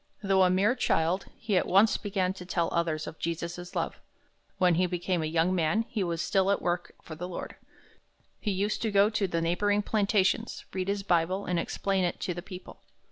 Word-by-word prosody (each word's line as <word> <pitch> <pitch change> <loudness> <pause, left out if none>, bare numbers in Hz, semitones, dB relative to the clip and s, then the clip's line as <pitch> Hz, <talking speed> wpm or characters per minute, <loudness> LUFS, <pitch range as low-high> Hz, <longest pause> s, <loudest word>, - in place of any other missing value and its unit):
Though 195 -1 +3
a 185 - +5
mere 195 +6 +3
child, 185 -7 0
he 220 -4 -1
at - - +1
once 200 +4 +5
began 190 -3 -1
to 190 - -9
tell 175 -2 0
others 165 -2 0
of 160 - -9
Jesus' 170 +2 -4
love. - - -2 0.6
When 180 -1 +4
he 180 +2 +2
became 180 0 -1
a 155 - -1
young 165 +3 +2
man, 180 +6 +1
he 210 -4 -1
was 170 -2 -2
still 195 -1 +2
at 200 - +2
work 175 0 -2
for 160 - -9
the 170 +3 -5
Lord. 180 - -6 0.8
He 215 - -2
used 200 +2 -1
to 225 - 0
go 205 +1 +4
to 210 -2 0
the 170 -2 -1
neighboring 205 +5 +1
plantations, 210 +1 +1
read 185 0 -2
his 200 0 -1
Bible, 180 +2 +1
and 180 -1 0
explain 195 +2 -1
it 175 - -1
to 180 - -1
the 175 - -6
people. 185 -1 -11
185 Hz, 205 wpm, -29 LUFS, 170-200 Hz, 0.8 s, a